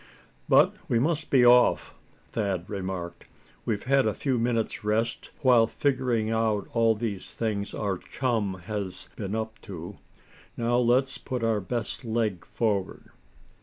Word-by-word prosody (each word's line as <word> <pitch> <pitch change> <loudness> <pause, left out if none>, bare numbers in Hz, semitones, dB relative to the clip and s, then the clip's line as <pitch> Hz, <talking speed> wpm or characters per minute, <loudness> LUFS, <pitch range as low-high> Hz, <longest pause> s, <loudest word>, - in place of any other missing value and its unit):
"But - - +6
we 120 - +2
must 155 +5 0
be 130 -3 +5
off," 125 +1 +5 0.3
Thad 100 -5 -2
remarked. 95 -3 -5 0.4
"We've 105 -3 -1
had 135 -1 +3
a 110 - 0
few 130 -4 0
minutes' 115 -2 -1
rest 110 +2 -1
while 120 -4 +6
figuring 125 -5 0
out 110 -2 0
all 115 -1 +3
these 105 -4 -5
things 105 -3 -2
our 100 -3 -2
chum 115 -7 -1
has 100 -4 -4
been 100 0 -4
up 110 0 -4
to. 95 -1 -8 0.6
Now 120 +1 +1
let's 125 +2 +2
put 125 -3 -4
our 110 -2 +1
best 115 +6 -3
leg 110 -6 -1
forward." 105 -5 -2
115 Hz, 140 wpm, -27 LUFS, 100-120 Hz, 0.6 s, But